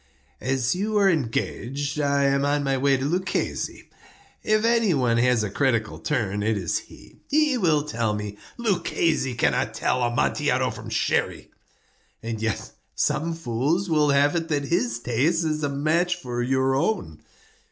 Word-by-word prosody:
"As 130 -1 0
you 210 +4 -1
are 200 -1 +4
engaged, 140 - -1
I 140 -1 +2
am 140 0 +2
on 145 0 +1
my 135 -1 +1
way 135 +1 +2
to 130 - -3
Luchesi. 180 +5 -2 0.5
If 215 +1 +1
any 230 -6 +3
one 120 -4 +2
has 125 -2 +3
a 105 - -3
critical 115 -4 0
turn, 105 -8 -1
it 110 +1 +1
is 90 -4 -1
he. - - -16
He 300 -1 +3
will 155 -7 +2
tell 115 -7 -1
me—" 105 -1 -5 0.2
"Luchesi 170 - 0
cannot - - +1
tell 125 - 0
Amontillado 120 0 +1
from - - -9
Sherry." - - -1 0.7
"And 115 -1 -4
yet 110 -2 -2 0.2
some 165 +2 0
fools 165 +6 -1
will 150 -2 +3
have 145 +2 +3
it 165 -1 -1
that 145 -3 0
his 120 -9 +1
taste 140 +9 0
is 155 -1 -1
a 145 - +1
match 155 +6 +1
for 120 -1 -4
your 130 +1 +1
own." 140 - -1
140 Hz, 160 wpm, -24 LUFS, 120-165 Hz, 0.7 s, are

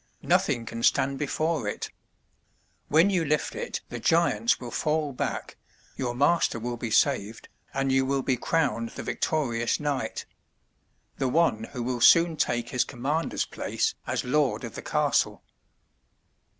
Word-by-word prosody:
Nothing 115 - +1
can 115 +1 -6
stand 135 +3 +2
before 155 -3 -1
it. 105 - -4 1.0
When 165 +7 +4
you 180 -4 +1
lift 150 0 0
it - - -4
the - - -5
giants 120 -9 +2
will 120 -2 -7
fall 150 0 0
back, - - -4 0.4
your 120 -2 -3
master 145 0 +2
will 120 +2 -3
be 115 0 -4
saved, 110 0 +1 0.2
and 135 0 0
you 135 0 +3
will 135 0 0
be 130 - +1
crowned 125 -4 0
the - - -8
victorious 120 -7 -1
knight 140 -6 -2 0.5
— - - -39
^the 135 - +1
one 125 -9 +2
who 120 - -6
will 125 0 -2
soon 170 +3 +6
take 120 -5 -1
his 125 -3 +1
commander's 140 +6 -2
place - - -2
as - - -1
lord 145 +1 +1
of - - -6
the - - -6
castle." - - 0
135 Hz, 150 wpm, -27 LUFS, 120-155 Hz, 1.0 s, soon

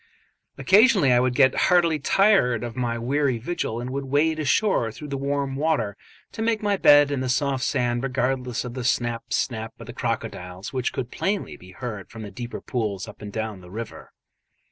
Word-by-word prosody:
Occasionally 200 - +5
I 120 - +5
would 125 0 +1
get 130 -2 +5 0.2
heartily 170 -4 +4
tired 145 - +3
of 120 -1 -5
my 120 -2 -1
weary 130 +2 0
vigil 120 -3 -3
and 125 +1 -5
would 140 +1 -3
wade 155 +4 +1
ashore 155 - +2
through 150 +6 -9
the 140 - -3
warm 140 0 -2
water, 140 -9 0 0.4
to - - -6
make 225 -1 0
my 205 -1 +2
bed 145 -5 +6
in 140 - -1
the 130 0 -2
soft 130 +1 0
sand 120 -1 0
regardless 125 -1 -1
of 120 - -6
the 130 0 -5
snap, 120 -1 -1
snap 110 -2 -2
of - - -9
the - - -9
crocodiles 90 +4 -4
which 130 -2 -1
could 125 -2 -5
plainly 200 +1 -2
be 90 0 -14
heard 110 -6 -6
from 110 - -9
the 100 - -8
deeper 120 +4 -6
pools 105 -5 -3
up 105 - -12
and 105 -1 -7
down 110 -3 -4
the 90 - -13
river. 110 +4 -8
125 Hz, 195 wpm, -24 LUFS, 115-145 Hz, 0.4 s, bed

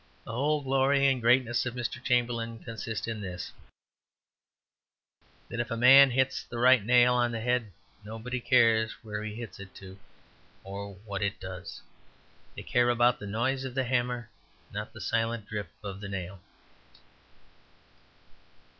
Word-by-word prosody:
The - - -8
whole 145 +5 0
glory 135 +1 +2
and 135 -2 +2
greatness 120 0 +3
of 120 - -5
Mr. 120 -2 -4
Chamberlain 120 -2 0
consists 115 -2 -5
in 110 -2 -4
this: 90 -3 -6 2.0
that 120 - -6
if 120 - -2
a 115 - -3
man 135 +3 +8
hits 130 +1 0
the 120 - -8
right 125 -1 +5
nail 125 +2 +5
on 120 -1 +2
the 115 - -3
head 120 -2 0 0.3
nobody 115 +4 -5
cares 115 -3 +3
where 105 -1 -5
he 105 -1 -5
hits 115 -6 -8
it 100 -1 -11
to 95 0 -12 0.6
or 100 +1 -7
what 100 -1 -4
it 100 -1 -2
does. 95 0 -8 0.7
They - - -7
care 120 0 +2
about 120 0 +3
the 105 - -7
noise 125 +6 -1
of 130 -2 -6
the 135 - +1
hammer, 125 -2 -1 0.4
not 105 - -3
about - - -26
the 110 - -10
silent 115 +2 -1
drip 105 -1 -5
of 100 -1 -6
the 100 - -6
nail. 95 -1 -6
115 Hz, 155 wpm, -29 LUFS, 105-125 Hz, 2.0 s, man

